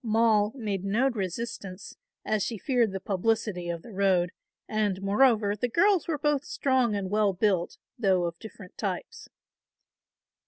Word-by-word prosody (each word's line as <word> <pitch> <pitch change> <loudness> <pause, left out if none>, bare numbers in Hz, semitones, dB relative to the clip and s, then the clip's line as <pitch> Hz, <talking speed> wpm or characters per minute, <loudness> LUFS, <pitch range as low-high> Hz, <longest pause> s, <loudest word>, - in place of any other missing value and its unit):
Moll 220 -2 +3
made 205 -7 -3
no 230 +7 +2
resistance, 195 -2 -5 0.3
as 215 -1 0
she 230 - -3
feared 240 -1 +1
the 190 - -4
publicity 195 -2 -1
of 170 -1 -4
the 235 - -11
road 185 -3 +2 0.4
and 210 -3 0
moreover 205 +1 +3
the 245 +4 -2
girls 385 - +3
were 320 -3 -1
both 290 -1 +1
strong 260 -7 +1
and 195 -2 -3
well 210 -2 +2
built, 185 -2 0 0.2
though 190 -5 +3
of 170 0 -3
different 200 -4 -12
types. 225 - -4
210 Hz, 150 wpm, -27 LUFS, 190-235 Hz, 0.4 s, Moll